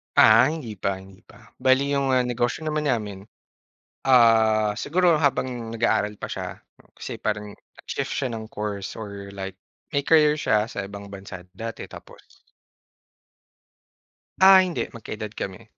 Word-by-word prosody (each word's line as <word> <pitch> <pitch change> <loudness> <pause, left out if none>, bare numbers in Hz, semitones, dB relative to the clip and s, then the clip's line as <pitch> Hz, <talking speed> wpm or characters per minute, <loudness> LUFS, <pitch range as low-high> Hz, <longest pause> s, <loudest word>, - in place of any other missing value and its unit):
Ah, 115 +4 +7
hindi 135 - -5
pa, 100 +1 -1
hindi 95 0 -14
pa. 115 - -18
Bale 130 +1 +4
'yong, 135 -2 +1
ah, 125 - +3
negosyo 125 +3 -1
naman 155 -1 -1
namin, 105 -5 -2 0.8
ah, 110 -4 +4
siguro 175 +4 +2
habang 130 -5 -1
nag-aaral 110 -2 +1
pa - - -5
siya. - - -6 0.3
Kasi - - -7
parang 105 -1 -3
nag-shift - - -6
siya 130 - -1
ng 110 - -7
course 105 -2 -4
or 100 -2 -8
like 95 -1 -6 0.3
may 140 -1 -1
career 150 -2 +5
siya 105 -5 +1
sa 100 -3 -5
ibang 100 0 -9
bansa 95 -2 -9 0.2
dati, 115 +1 -6
tapos - - -15 2.0
Ah, 190 0 +10
hindi, 180 -3 0
magka-edad 110 -2 -7
kami. 100 +1 -6
115 Hz, 140 wpm, -24 LUFS, 100-135 Hz, 2.0 s, Ah